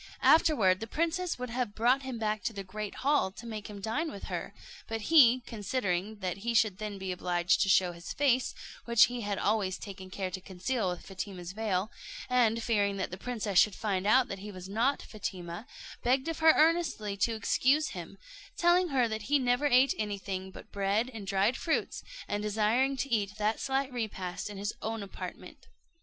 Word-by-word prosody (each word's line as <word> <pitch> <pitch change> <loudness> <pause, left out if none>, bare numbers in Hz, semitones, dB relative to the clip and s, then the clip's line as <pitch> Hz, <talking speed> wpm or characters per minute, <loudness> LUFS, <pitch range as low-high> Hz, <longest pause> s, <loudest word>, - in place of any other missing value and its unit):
Afterward 220 - +5
the 225 - -5
princess 335 +6 -1
would 250 -1 -5
have 240 -3 -2
brought 245 +4 +3
him 260 -3 -5
back 215 -1 -1
into 225 - -3
the 200 -1 -5
great 210 +2 -6
hall 285 -8 +3
to 235 - -11
make 215 -2 -6
him 205 -1 -8
dine 285 +11 -1
with 200 - -9
her; - - -3 0.4
but 225 0 -3
he, 255 -2 +6
considering 210 -3 -2
that 185 -1 -2
he 235 +4 -2
should 215 -3 +3
then 210 -2 -4
be 190 -1 -4
obliged 175 0 +1
to 195 - +2
show 185 -1 +4
his 170 0 -8
face, 260 -3 +1 0.3
which 235 -1 +6
he 245 +2 +1
had 205 -2 -2
always 200 -3 0
taken 190 -2 -9
care 185 0 -4
to 185 0 -5
conceal 190 +3 -2
with 180 -1 -5
Fatima's 185 -2 -6
veil, 210 0 -1 0.4
and 230 -2 +3
fearing 205 -3 +1
that 190 - -3
the - - -4
princess 210 -4 0
should 210 - +4
find 200 -3 -1
out 250 +4 +5
that 195 - -6
he 205 +2 -7
was 185 -1 -9
not 235 +8 0
Fatima, 185 -1 -6 0.3
begged 260 +4 +1
of 330 -1 -3
her 320 0 +7
earnestly 315 -11 +2
to 225 +4 +1
excuse 270 +7 +2
him, - - -8 0.4
telling 350 +1 +4
her 260 -6 +2
that 220 +1 -5
he 290 - +5
never 250 +2 +2
ate 260 0 +5
anything 195 -3 -3
but 190 - -13
bread 205 +5 0
and 210 -3 -7
dried 200 +4 +2
fruits, 320 +2 -1 0.3
and 205 0 -2
desiring 220 +6 +1
to 270 +1 -3
eat 210 -1 0
that 215 +1 0
slight 270 -1 -1
repast 205 -6 -4
in 205 - -8
his 205 +2 -3
own 225 -1 -3
apartment. 200 - -9
215 Hz, 195 wpm, -30 LUFS, 195-250 Hz, 0.4 s, her